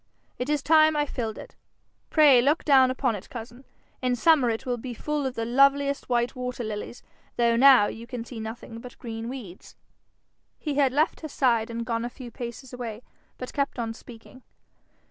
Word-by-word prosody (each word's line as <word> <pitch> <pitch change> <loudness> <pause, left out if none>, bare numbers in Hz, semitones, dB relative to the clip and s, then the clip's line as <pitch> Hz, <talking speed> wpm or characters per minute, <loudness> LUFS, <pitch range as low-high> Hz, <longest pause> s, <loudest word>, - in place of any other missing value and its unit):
It 250 +3 -3
is 295 -2 0
time 310 0 +5
I 295 - +2
filled 225 -6 -4
it. - - -11 0.5
Pray 290 -6 +6
look 290 +6 +1
down 265 -3 +6
upon 255 -2 0
it, 195 - -10
cousin. 240 +2 -9 0.4
In 250 -1 +1
summer 280 -1 +4
it 225 -1 -3
will 245 -1 -1
be 245 0 -6
full 295 +3 -2
of 260 - -5
the 225 - -2
loveliest 275 +3 +2
white 240 +1 0
water 250 -1 -4
lilies, 215 +2 -6 0.3
though 235 -1 +3
now 260 -3 +7
you 230 +3 -6
can 235 -1 -6
see 235 -2 -8
nothing 225 +1 -7
but 250 +1 -11
green 225 -1 -6
weeds.' 225 -9 -9 0.8
He 300 - -3
had 275 -2 +3
left 300 +5 +1
her 310 - -6
side 235 -5 +1
and 230 0 -4
gone 230 -1 -2
a 240 - -3
few 245 -1 -10
paces 240 +2 -8
away, 235 -2 -6 0.3
but 255 - -7
kept 280 -2 -1
on 230 -2 -3
speaking. 235 +2 -14
250 Hz, 190 wpm, -26 LUFS, 230-275 Hz, 0.8 s, now